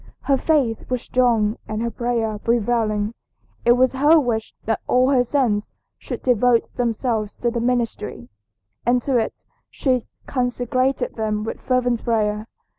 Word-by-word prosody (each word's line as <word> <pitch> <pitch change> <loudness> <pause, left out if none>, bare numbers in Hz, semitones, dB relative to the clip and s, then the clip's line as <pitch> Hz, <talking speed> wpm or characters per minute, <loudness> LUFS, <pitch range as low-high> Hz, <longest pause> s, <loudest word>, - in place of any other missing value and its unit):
Her 275 - +2
faith 265 -6 0
was 250 -2 -1
strong 230 -4 +2
and 215 0 -3
her 235 - -1
prayer 230 -3 -1
prevailing. 225 -2 0 0.5
It 240 - +7
was 255 +1 +3
her 295 +5 +5
wish 230 -5 -1
that 225 -1 0
all 255 +2 +3
her 255 -3 +4
sons 235 -6 0 0.3
should - - -6
devote 245 -1 +2
themselves 230 -3 -1
to 240 - -1
the 235 - -2
ministry, 235 - -2 0.6
and 245 +1 +3
to 270 -3 +1
it 225 - -4 0.3
she 255 -4 0 0.2
consecrated 250 0 -1
them 215 -1 -1
with 225 - -5
fervent 250 -2 +1
prayer. 215 -2 0
240 Hz, 145 wpm, -22 LUFS, 220-255 Hz, 0.6 s, It